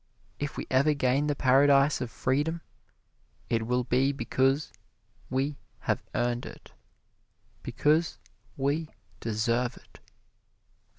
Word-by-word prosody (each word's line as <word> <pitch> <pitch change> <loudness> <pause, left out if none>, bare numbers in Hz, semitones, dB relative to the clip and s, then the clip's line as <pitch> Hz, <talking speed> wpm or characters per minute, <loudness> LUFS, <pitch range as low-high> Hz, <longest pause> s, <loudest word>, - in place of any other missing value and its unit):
If 145 0 -4
we - - -3
ever 140 +3 +4
gain 140 +2 +1
the 145 - 0
paradise 140 +2 +4
of 125 - -3
freedom 150 +8 -1 0.9
it 115 -1 0
will 125 +1 +1
be 130 +3 +2
because 135 +2 0 0.6
we 135 +3 -1 0.2
have - - 0
earned 120 0 0
it - - -12 0.9
because 155 +3 +1 0.4
we 145 +4 0 0.3
deserve 115 +3 0
it. - - -18
135 Hz, 110 wpm, -28 LUFS, 125-145 Hz, 0.9 s, ever